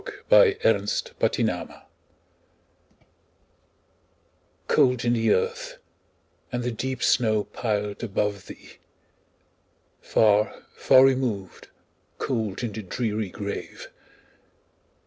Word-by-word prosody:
Emily 435 Hz, -5 st, +7 dB
Brontë 485 Hz, +1 st, 0 dB, 0.2 s
Remembrance -, -, -3 dB, 2.8 s
COLD 125 Hz, -1 st, +2 dB
in 120 Hz, -, +2 dB
the 115 Hz, -1 st, +1 dB
earth, -, -, -1 dB, 0.7 s
and 125 Hz, -1 st, -3 dB
the 125 Hz, -, -2 dB
deep 130 Hz, +2 st, -4 dB
snow 110 Hz, -3 st, +2 dB
piled 105 Hz, -3 st, -3 dB
above 105 Hz, -2 st, -2 dB
thee! -, -, -13 dB, 1.2 s
Far, 105 Hz, -1 st, +2 dB
far 130 Hz, 0 st, +6 dB
removed, 125 Hz, -8 st, -1 dB, 0.5 s
cold 110 Hz, -4 st, -3 dB
in 115 Hz, -, -2 dB
the 110 Hz, -, -6 dB
dreary 105 Hz, 0 st, -3 dB
grave! 100 Hz, +1 st, -7 dB
115 Hz, 90 wpm, -25 LUFS, 105-130 Hz, 2.8 s, Emily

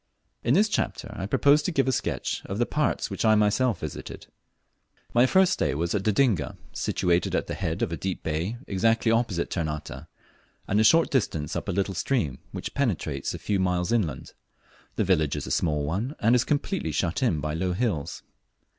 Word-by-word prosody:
In -, -, +3 dB
this 215 Hz, -, +5 dB
chapter 120 Hz, -, -2 dB
I 95 Hz, -, -4 dB
propose 145 Hz, +7 st, +4 dB
to 180 Hz, -, -2 dB
give 135 Hz, -5 st, +1 dB
a -, -, +3 dB
sketch -, -, -2 dB
of 95 Hz, -, -4 dB
the 120 Hz, -, +2 dB
parts 150 Hz, +3 st, -1 dB
which -, -, -3 dB
I 110 Hz, -1 st, +5 dB
myself 105 Hz, +4 st, +2 dB
visited. 80 Hz, -, -7 dB, 0.9 s
My 120 Hz, +2 st, +5 dB
first 185 Hz, +4 st, +4 dB
stay -, -, 0 dB
was 85 Hz, +3 st, -1 dB
at 105 Hz, -, 0 dB
Dodinga, 105 Hz, -, +1 dB, 0.2 s
situated 85 Hz, -1 st, 0 dB
at -, -, 0 dB
the -, -, -5 dB
head 80 Hz, -1 st, -2 dB
of -, -, -1 dB
a 85 Hz, -, -3 dB
deep 95 Hz, -1 st, -4 dB
bay 85 Hz, +9 st, -2 dB
exactly 115 Hz, +4 st, +2 dB
opposite 115 Hz, -7 st, 0 dB
Ternate, 75 Hz, -4 st, -4 dB, 0.6 s
and 100 Hz, -, +2 dB
a -, -, +5 dB
short 165 Hz, +9 st, +5 dB
distance 80 Hz, -, -1 dB
up -, -, -3 dB
a -, -, +2 dB
little 95 Hz, +1 st, -1 dB
stream 85 Hz, -, -1 dB
which -, -, -6 dB
penetrates 85 Hz, -, -1 dB
a -, -, -5 dB
few 100 Hz, -2 st, -1 dB
miles 90 Hz, +1 st, 0 dB
inland. 85 Hz, -, -1 dB, 0.6 s
The -, -, +1 dB
village 80 Hz, -6 st, +2 dB
is 75 Hz, -, -4 dB
a -, -, -6 dB
small 75 Hz, -3 st, +1 dB
one, 105 Hz, -, -2 dB
and 115 Hz, +3 st, +3 dB
is 125 Hz, 0 st, +3 dB
completely 150 Hz, -, -1 dB
shut 85 Hz, -, -1 dB
in 105 Hz, -12 st, +2 dB
by 75 Hz, +1 st, -3 dB
low 90 Hz, +3 st, -1 dB
hills. 90 Hz, -, -2 dB
95 Hz, 195 wpm, -26 LUFS, 80-120 Hz, 0.9 s, this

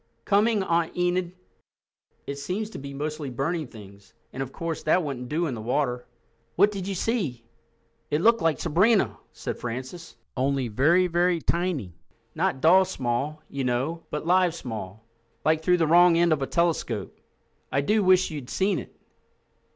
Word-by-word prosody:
"Coming, 210 Hz, 0 st, +3 dB
Aunt 170 Hz, -2 st, 0 dB
Enid! 180 Hz, 0 st, 0 dB, 0.9 s
It 140 Hz, -, -5 dB
seems 205 Hz, +8 st, -3 dB
to -, -, -7 dB
be 140 Hz, 0 st, -7 dB
mostly 150 Hz, +1 st, -4 dB
burning 145 Hz, +5 st, -2 dB
things, 100 Hz, -3 st, -14 dB, 0.2 s
and, 135 Hz, -, -5 dB
of 135 Hz, -1 st, -4 dB
course, 165 Hz, +1 st, -4 dB
that 170 Hz, +3 st, +2 dB
wouldn't 125 Hz, -4 st, -5 dB
do 165 Hz, +3 st, 0 dB
in 145 Hz, -, -2 dB
the 110 Hz, -, -6 dB
water. 125 Hz, +1 st, -1 dB, 0.5 s
What 205 Hz, -, +5 dB
did 195 Hz, -2 st, -5 dB
you 195 Hz, -, -2 dB
see?" 170 Hz, -, -2 dB, 0.6 s
"It 150 Hz, -, +1 dB
looked 230 Hz, +3 st, +4 dB
like 160 Hz, -5 st, +1 dB
Sabrina," 175 Hz, -, +2 dB
said -, -, -6 dB
Francis—"only 130 Hz, 0 st, -4 dB
tiny, 175 Hz, -, +3 dB
tiny. 170 Hz, -, -1 dB, 0.4 s
Not 160 Hz, -5 st, -1 dB
doll 185 Hz, +4 st, +6 dB
small, 145 Hz, -1 st, -3 dB
you 140 Hz, -1 st, -4 dB
know, 130 Hz, +7 st, -1 dB
but 150 Hz, -, -4 dB
live 180 Hz, -1 st, +3 dB
small, 110 Hz, -, -7 dB, 0.4 s
like 160 Hz, 0 st, +3 dB
through 180 Hz, +2 st, +3 dB
the 165 Hz, -, +2 dB
wrong 170 Hz, +1 st, +6 dB
end 170 Hz, -1 st, +4 dB
of 150 Hz, -, -2 dB
a 135 Hz, -, -1 dB
telescope. 160 Hz, -, -1 dB, 0.6 s
I 135 Hz, +2 st, +2 dB
do 210 Hz, +8 st, +2 dB
wish 185 Hz, -1 st, +4 dB
you'd 140 Hz, -5 st, -7 dB
seen 195 Hz, +1 st, +1 dB
it." -, -, -12 dB
155 Hz, 160 wpm, -26 LUFS, 130-180 Hz, 0.9 s, doll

